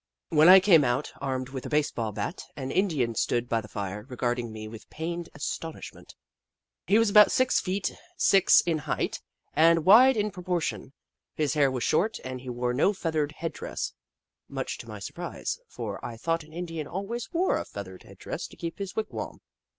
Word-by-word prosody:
When 155 +1 +6
I 190 +1 +11
came 180 -6 +6
out, 125 +3 0
armed 130 -2 -2
with 130 -2 -6
a - - -7
base 150 -1 +1
ball 115 -2 -3
bat, 165 - -4
an 130 -2 -5
Indian 150 - +1
stood 120 +2 0
by 115 -2 0
the 105 - -11
fire, 100 -1 -5
regarding 120 -2 -2
me 110 0 -7
with 110 0 -11
pained 170 +1 -5
as 145 - -8
tonishment. 165 -1 -7 0.7
He 200 - +5
was 225 -2 +3
about 210 0 +8
six 255 0 +3
feet 190 +1 -2 0.2
six 195 -1 +6
in 165 -2 -1
height, - - -2 0.3
and 165 0 +4
wide 245 +6 +8
in 210 0 0
proportion. 180 -7 -3 0.4
His 150 -1 0
hair 145 -3 +3
was 130 -2 -3
short, 210 +8 +1
and 130 -1 -5
he 130 - -8
wore 125 0 -1
no 150 +11 +3
feathered 155 -5 -1
head 165 +1 -4
dress, - - -5 0.6
much - - -4
to - - -9
my - - -7
surprise, - - -5
for - - -6
I 115 -1 -6
thought 165 +6 -1
an 155 - -17
Indian 165 -2 -5
always 220 +5 -5
wore 360 +2 +1
a - - -3
feathered - - -9
head - - -15
dress - - -5
to - - -16
keep 170 +1 -6
his 195 -1 -4
wigwa'm. 220 -1 -4
160 Hz, 195 wpm, -27 LUFS, 130-190 Hz, 0.7 s, I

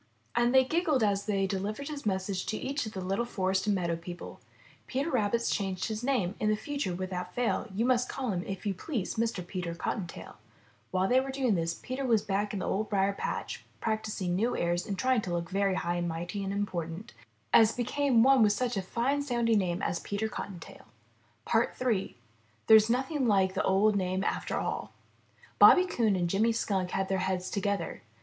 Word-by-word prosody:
And 240 0 +3
they 260 0 +6
giggled 310 -4 +1
as 200 -1 +1
they 195 -2 +1
deHvered 205 +8 -3
his 285 -6 -5
message 190 -1 -1
to 215 - -1
each 275 -2 -2
of 215 - -8
the 190 - -4
Httle 195 +6 -1
forest 190 -2 0
and 205 - +3
meadow 170 -3 0
people: 175 +1 -8
n - - -31 0.4
Peter 275 +5 -1
Rabbit^s 235 -1 +1
changed 190 -2 -2
his 220 +1 -4
name. 245 -9 +1
In 215 0 +2
future 245 -6 -3
without 185 0 -5
fail 245 -1 0
You 215 +5 0
must 250 -1 +2
call 260 -4 -2
him, 180 -2 -2
if 195 +1 -5
you 200 - +1
please, 215 - -3
Mr. 225 -5 -1
Peter 175 -2 -4
Cottontail/' 175 0 -5 0.5
While 185 +1 +1
they 255 +4 +4
were 270 +1 -3
doing 265 -4 +1
this, 165 -2 -1
Peter 255 +2 -5
was 230 -5 +2
back 205 0 -1
in 205 - -3
the - - -3
Old 210 +2 -1
Briar 200 -1 +2
patch - - -4 0.2
practicing 215 -5 -2
new 225 +6 0
airs 175 +1 0
and 195 - -3
trying 255 +1 +2
to 180 -3 -4
look 170 -1 -3
very 195 0 +1
high 175 -1 -1
and 175 0 -1
mighty 175 +4 -4
and 195 - -3
important, 195 0 -4 0.4
as 225 -1 +7
became 250 0 +2
one 270 -1 +6
with 210 -1 +5
such 245 +2 -1
a 195 - 0
fine 245 +9 0
sounding 235 -5 +2
name 180 -1 -1
as 170 - 0
Peter 205 +2 -2
Cotton 200 -4 -6
tail. - - -13 0.7
III. 230 -2 +1 0.5
THERE'S 220 0 +7
NOTHING 265 +2 0
LIKE 190 -3 +3
THE 190 - 0
OLD 200 +2 +3
NAME 185 0 0
AFTER - - -2
ALL - - -3 0.7
Bobby 365 -1 +8
Coon 225 - +1
and 175 -2 0
Jimmy 215 +6 +2
Skunk 190 -5 -1
had 195 +1 -1
their 190 0 0
heads 185 0 -2
together. 200 -1 -2
205 Hz, 200 wpm, -30 LUFS, 185-240 Hz, 0.7 s, Bobby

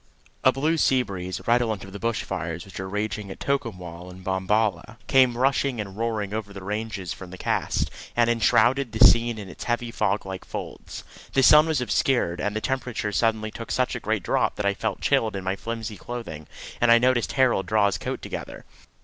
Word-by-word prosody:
A 130 - +6
blue 155 +5 0
sea 130 -3 +3
breeze, 95 -4 -5
redolent 115 -3 +1
of 95 0 -11
the 100 - -6
bush 115 0 -1
fires 85 +1 -4
which 95 - -9
were 95 0 -4
raging 105 0 -3
at - - -8
Tocumwal 90 -11 -3
and 90 +1 -12
Bombala, 95 +2 0
came 130 -3 +4
rushing 135 -1 +1
and 100 -2 -5
roaring 110 -2 -2
over 110 -2 -4
the 95 -1 -8
ranges 105 -3 -3
from 95 - -10
the 95 - -9
cast, - - -1 0.3
and 120 -1 +4
enshrouded 120 +2 +3
the 110 +3 +7
scene 115 -1 +5
in 100 -2 -7
its 90 - -9
heavy 120 0 -1
fog 105 -3 0
like 95 -1 -6
folds. - - -7 0.3
The 135 - +3
sun 150 +4 +8
was 155 -5 +1
obscured, 120 -8 +1
and 105 +3 -1
the 110 - -1
temperature 125 -5 -2
suddenly 110 0 +1
took 115 - -8
such 130 -1 0
a - - -3
great - - -1
drop - - +1
that 105 - -3
I 100 - +3
felt - - -3
chilled 110 -2 +2
in 95 - -4
my 95 +1 -1
flimsy 110 -1 -5
clothing, 115 -12 -7 0.3
and 120 -1 +5
I 115 - +8
noticed 125 0 +2
Harold 125 -8 +2
draw 105 0 +3
his 95 -6 0
coat - - -4
together. - - -7
110 Hz, 205 wpm, -25 LUFS, 95-120 Hz, 0.3 s, sun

